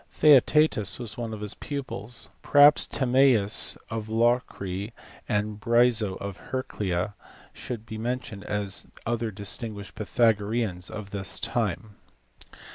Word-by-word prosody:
Theaetetus 150 -6 +4
was 115 -4 -6
one 115 -2 -4
of 110 -1 -7
his 105 0 -2
pupils. 125 -5 -3
Perhaps 145 0 +6
Timaeus 125 -5 +3
of 110 -1 -4
Locri 110 -3 0 0.4
and 105 0 -1
Bryso 115 -3 +2
of 100 -2 -6
Heraclea 105 -7 -2 0.4
should 115 -3 -7
be 110 -1 -7
mentioned 115 -4 -4
as 100 -2 -3 0.2
other 115 -1 -1
distinguished 100 0 -5
Pvthagoreans 110 -3 0
of 105 -2 -8
this 95 -2 -5
time. 105 -1 -2
110 Hz, 115 wpm, -26 LUFS, 100-120 Hz, 0.4 s, Perhaps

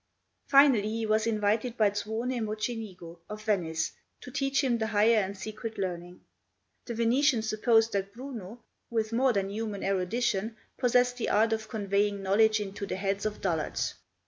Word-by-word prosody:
Finally 270 -7 +5
he 225 +1 -2
was 215 +1 +2
invited 220 +2 0
by 210 -2 +4
Zuone 225 +4 -2
Mocenigo 215 -6 -5
of 210 0 -7
Venice 165 -7 0 0.3
to 255 - -10
teach 275 +2 0
him 240 -3 +1
the 220 - 0
higher 220 +2 +4
and 200 -1 -1
secret 215 +3 -6
learning. 180 -2 -4 0.6
The 235 - -5
Venetian 235 +2 +3
supposed 225 +1 +3
that 195 0 -1
Bruno, 235 -2 -8 0.3
with 225 -1 -1
more 260 +2 +3
than 195 -3 -1
human 210 -1 -4
erudition, 195 +3 -1 0.2
possessed 245 0 +2
the 245 - -2
art 225 +2 +3
of 220 -1 -4
conveying 200 -1 0
knowledge 215 +3 +4
into 200 0 -5
the - - -3
heads 195 +2 -1
of 210 - -6
dullards. 165 -5 -1
215 Hz, 160 wpm, -29 LUFS, 200-230 Hz, 0.6 s, Finally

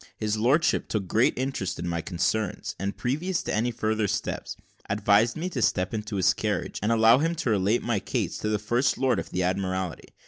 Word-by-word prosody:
His 105 0 -1
lordship 130 +10 +2
took 100 -4 -2
great 110 +6 +2
interest 130 -8 -2
in 85 - -4
my 85 -1 -1
concerns; 95 +4 -2
and, 100 +2 -3
previous 165 +9 -1
to - - -3
any 115 +3 +1
further 110 -2 -1
steps, - - -3 0.3
advised 105 +4 +3
me 170 +3 -2
to 135 -9 -3
step 90 0 +1
into 105 -1 -4
his 95 - +3
carriage, - - -2
and 105 +3 +1
allow 115 +2 +6
him 165 +3 0
to 130 -7 -1
relate 105 +3 +2
my 115 -4 0
case - - -2
to 105 - -2
the 105 - +1
First 120 +6 +1
Lord 130 -2 +2
of - - -6
the 90 0 -1
Admiralty. 95 -1 -2
110 Hz, 205 wpm, -26 LUFS, 100-120 Hz, 0.3 s, allow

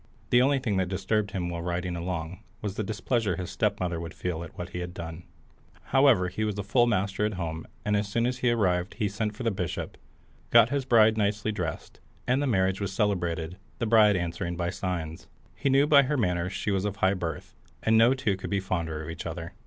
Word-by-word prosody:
The 125 - +6
only 140 +2 +3
thing 115 -7 -1
that 95 -1 0
disturbed 100 +2 0
him 90 -3 -3
while 85 -1 -4
riding 90 +1 -2
along 85 0 -4 0.2
was 105 -3 -3
the 110 - -3
displeasure 105 -1 -1
his 90 +1 -5
stepmother 95 -6 -1
would 85 0 -7
feel 85 -2 -3
at 85 - -11
what 90 0 -5
he 90 - -5
had 90 0 -6
done. 85 0 -7 0.7
However, 135 -9 +5
he 95 +5 -3
was 105 -2 -1
full 120 +5 +3
master 100 -2 0
at 105 -1 0
home, 80 -3 -4 0.2
and 105 0 +2
as 105 0 0
soon 115 +4 0
as 125 0 -1
he 125 - +2
arrived 95 -6 +1
he 110 -3 0
sent 105 +1 -3
for 125 - -6
the 115 - +1
bishop, 90 -3 -4 0.5
got 115 +1 +6
his 140 -2 0
bride 110 -3 +5
nicely 105 +1 0
dressed, 90 -7 -5 0.3
and 130 +3 +2
the 145 - 0
marriage 95 -4 +1
was 100 -1 -2
celebrated, 90 -5 -1 0.2
the 115 - -1
bride 110 -2 +5
answering 85 0 -2
by 85 0 -1
signs. 85 -4 -4 0.3
He 140 - -1
knew 135 +2 +5
by 145 -1 +7
her 140 +2 0
manners 90 -5 0
she 100 - -2
was 95 -1 0
of 100 -1 -2
high 95 0 +2
birth, 85 -5 -5 0.3
and 110 - +3
no 115 +4 +6
two 110 -7 0
could - - -6
be 100 - +1
fonder 85 -5 -3
of 80 - -7
each 85 - -6
other. 85 +1 -6
95 Hz, 225 wpm, -27 LUFS, 90-110 Hz, 0.7 s, by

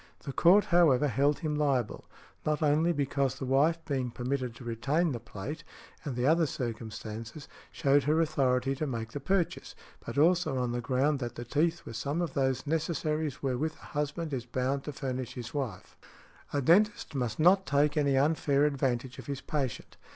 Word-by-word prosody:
The 140 - -5
Court, 185 +8 +5
however, 150 -5 +5
held 140 +5 +1
him 155 -3 -1
liable, 140 -6 0 0.4
not 155 +1 0
only 155 +3 +3
because 140 -3 0
the 135 - -4
wife 140 +6 +3
being 130 -4 -1
permitted 125 0 -3
to 125 - -11
retain 140 +9 0
the 120 - -3
plate, 115 +8 -7 0.4
and 140 -6 -4
the 125 +1 0
other 160 +2 +4
circumstances, 115 +1 -6 0.2
showed 140 0 +2
her 155 +2 +3
authority 135 -4 +1
to 155 - -2
make 115 -3 -4
the 145 - -4
purchase, 180 +4 -1 0.3
but - - -6
also 160 -2 +3
on 125 -1 -1
the 120 0 -2
ground 135 +5 +1
that 120 -2 -4
the 120 - -6
teeth 165 +7 0
were - - -7
some 140 +8 -2
of 170 -6 -2
those 130 -1 0
necessaries 155 -2 -1
wherewith 135 +4 -1
a - - -14
husband 150 +1 -2
is 125 -3 -2
bound 130 +3 -1
to 150 - -3
furnish 130 -3 -4
his 120 -2 -7
wife. 135 -6 -4 0.6
A 145 -1 0
dentist 205 +4 +3
must 125 -5 -2
not 190 +4 +5
take 145 +1 +2
any 140 -3 +2
unfair 145 0 +2
advantage 130 -3 -1
of 125 - -10
his 140 -1 -4
patient. 135 -6 -4
140 Hz, 180 wpm, -30 LUFS, 125-155 Hz, 0.6 s, Court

